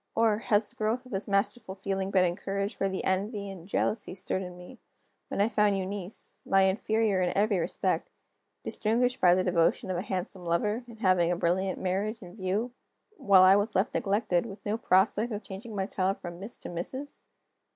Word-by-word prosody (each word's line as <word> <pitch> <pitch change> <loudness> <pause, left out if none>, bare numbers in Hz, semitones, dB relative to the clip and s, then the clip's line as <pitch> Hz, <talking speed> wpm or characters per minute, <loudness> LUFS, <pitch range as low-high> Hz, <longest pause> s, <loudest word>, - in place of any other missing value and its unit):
Or, 225 -2 +3
has 210 -1 +2
the - - -7
growth 225 +4 -1
of 255 - -14
this 195 +1 -3
masterful 200 0 -1
feeling 195 0 -2
been 185 -2 +4
encouraged 195 +3 -2
by 195 - +2
the 190 -1 -3
envy 200 +1 -1
and 180 -2 -10
jealousy 210 0 -1
stirred 190 0 -2
in 180 -1 -7
me, 180 +8 -12 0.5
when - - -4
I 205 - +4
found 210 -3 +2
Eunice 190 +1 -5
(my 195 0 +4
inferior 210 +1 +1
in 180 +1 0
every 205 -2 +3
respect) 165 - -1 0.5
distinguished 245 +3 0
by 175 -1 +6
the 185 - +1
devotion 175 +1 +2
of 180 - -1
a - - -1
handsome 185 -1 -4
lover, 210 +8 0
and 225 -2 -13
having 180 -3 +3
a - - +1
brilliant 185 +3 0
marriage 200 +4 -2
in 175 +1 -11
view 205 +4 -1 0.5
while 195 -2 +6
I 190 +1 +8
was 205 +2 0
left 190 +3 +1
neglected, 200 -2 +1
with 200 -1 -11
no 210 +1 0
prospect 215 +2 +2
of 210 0 -4
changing 210 +3 -8
my 190 -1 0
title 195 -1 0
from 175 -2 -8
Miss 205 +5 -6
to - - -8
Mrs.? 260 +12 -5
195 Hz, 195 wpm, -29 LUFS, 185-215 Hz, 0.5 s, I